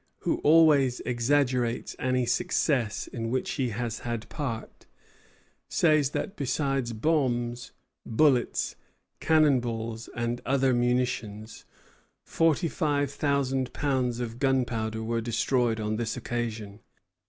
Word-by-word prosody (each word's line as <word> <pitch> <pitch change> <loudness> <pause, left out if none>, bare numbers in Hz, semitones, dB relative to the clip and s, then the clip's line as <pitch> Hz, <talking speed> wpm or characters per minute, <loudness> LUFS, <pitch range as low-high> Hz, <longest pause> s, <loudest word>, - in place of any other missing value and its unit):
Vaudreuil, - - +1
who - - -8
always 145 -5 +5
exaggerates 125 -1 0
any 125 -1 +1
success 140 -8 0
in 115 -2 -5
which 130 +2 -1
he 130 -3 -1
has 115 0 -3
had 115 -2 -4
part, 130 -8 -5 0.8
says 155 -5 +3
that 195 +7 -4
besides 135 -3 -1
bombs, 120 -2 -1 0.3
bullets, 125 +1 +2 0.4
cannon 155 -4 +4
balls, 115 -1 -5
and 120 0 -2
other 135 0 +2
munitions, 120 -3 -1 0.6
forty 165 +1 +1
five 145 -3 0
thousand 135 -3 0
pounds 130 -4 0
of 120 -1 -5
gunpowder 120 -5 0
were 115 +1 -1
destroyed 120 0 0
on 110 0 -2
this 115 0 -2
occasion. 110 -4 -4
125 Hz, 115 wpm, -27 LUFS, 115-140 Hz, 0.8 s, always